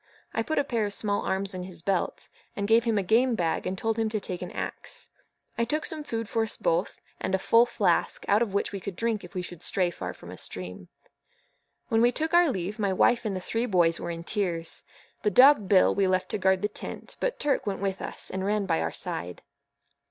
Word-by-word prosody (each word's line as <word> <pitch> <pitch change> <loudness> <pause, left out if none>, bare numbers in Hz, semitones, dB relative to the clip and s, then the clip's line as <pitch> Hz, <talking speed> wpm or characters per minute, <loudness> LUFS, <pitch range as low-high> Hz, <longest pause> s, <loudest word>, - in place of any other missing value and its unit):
I 225 - +1
put 315 +7 -2
a 285 - +4
pair 235 -6 0
of 200 - -2
small 205 -1 0
arms 195 +1 -1
in 185 - -4
his 180 -3 -8
belt, 195 -1 -1 0.4
gave 225 +3 +4
him 225 -2 +2
a 200 - +1
game 235 +5 +3
bag, 170 -5 -1
and 190 - -2
told 225 +2 -1
him 220 -1 +1
to 215 0 -1
take 180 -3 -5
an 180 - -4
axe. - - -6 0.5
I - - +3
took 300 +7 -1
some 310 -2 -4
food 230 -6 -3
for 225 - 0
us 225 - -2
both, 170 +3 0 0.2
and 190 - 0
a - - +2
full 230 +5 +4
flask, 185 -8 +1
out 205 +2 +4
of 230 -4 +1
which 200 - 0
we 200 - -4
could 190 0 -6
drink 230 +1 -1
if 180 +2 -12
we 180 - -2
should 175 -2 -8
stray 180 -2 +1
far 90 - -6
from 85 - -11
a 90 - -9
stream. 90 -1 -8 1.0
When 225 0 +3
we 240 +1 +5
took 315 +5 -2
our 345 -2 +6
leave, 200 -1 -3
my 200 -2 +1
wife 235 +5 +3
and 205 -3 -1
the 185 - -3
three 230 +6 -1
boys 175 -5 +3
were 175 - -4
in 170 0 -5
tears. 170 -4 -2 0.4
The 210 - +2
dog 255 -3 +7
Bill 190 -2 +5
we 195 -1 +2
left 185 0 +1
to - - -2
guard 190 0 +2
the - - +3
tent, 210 - -7
but - - -1
Turk 285 -6 0
went 195 -1 -1
with 195 0 -2
us, - - -4
and 190 0 -3
ran 205 +1 +1
by 165 -4 +1
our - - -1
side. 85 +2 -4
200 Hz, 240 wpm, -27 LUFS, 180-225 Hz, 1.0 s, dog